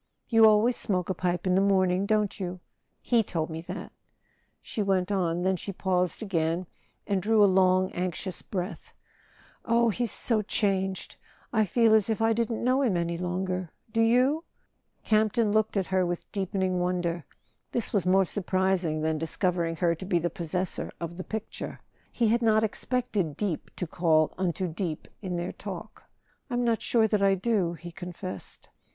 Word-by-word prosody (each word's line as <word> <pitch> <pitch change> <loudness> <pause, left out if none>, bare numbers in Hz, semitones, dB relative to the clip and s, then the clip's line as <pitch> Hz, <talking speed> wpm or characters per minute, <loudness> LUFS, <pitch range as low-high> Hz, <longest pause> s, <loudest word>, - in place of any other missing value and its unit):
"You 225 -1 +7
always 220 +3 +4
smoke 185 -3 -1
a - - +1
pipe 180 -1 -1
in 185 - +2
the 190 - +4
morning, 190 -1 +2
don't 210 -1 +1
you? 180 -1 -4 0.4
He 235 -2 +3
told 165 -6 -3
me 160 0 -5
that," - - -6 0.7
she 215 - -4
went 190 -1 +1
on; 175 -3 0
then 190 0 +2
she 200 - -5
paused 180 +1 0
again 170 -2 0 0.4
and 195 -2 0
drew 215 +2 +4
a - - +8
long 185 -1 +3
anxious 180 +1 -3
breath. 185 0 -5 0.7
"Oh, 235 0 +3
he's 235 +1 -1
so 225 -3 +1
changed! 195 -3 -1 0.4
I 220 -2 +3
feel 225 +3 +3
as 220 -1 +4
if 220 - 0
I 225 0 +3
didn't 230 0 -1
know 255 +3 +3
him 225 -10 +2
any 170 0 -1
longer—do 185 +4 -3
you?" 255 +7 +3 0.6
Campton 215 0 +2
looked 215 0 +1
at 190 - +1
her 185 +1 +1
with 175 -1 -4
deepening 190 -2 -1
wonder. 175 -2 -1 0.5
This 235 - -1
was 200 -4 +2
more 190 +1 +5
surprising 185 -4 0
than 160 0 0
discovering 170 0 0
her 170 0 +2
to 170 +3 -7
be 180 - +2
the 170 +1 -1
possessor 180 0 -2
of 170 0 -5
the 185 - -6
picture; 220 +2 -6 0.3
he 230 -3 +1
had 235 +2 +2
not 220 -1 +4
expected 215 - -1
deep 195 -7 -2
to 180 - -3
call 160 -2 +2
unto 185 0 -1
deep 165 -1 -4
in 185 -3 -3
their 175 +1 -3
talk. - - -8 0.4
"I'm 245 -1 0
not 230 -3 +1
sure 225 -2 +3
that 210 -1 +1
I 195 -1 +4
do," 190 -4 0
he 170 +1 -9
confessed. 180 +1 -8
190 Hz, 170 wpm, -28 LUFS, 175-215 Hz, 0.7 s, a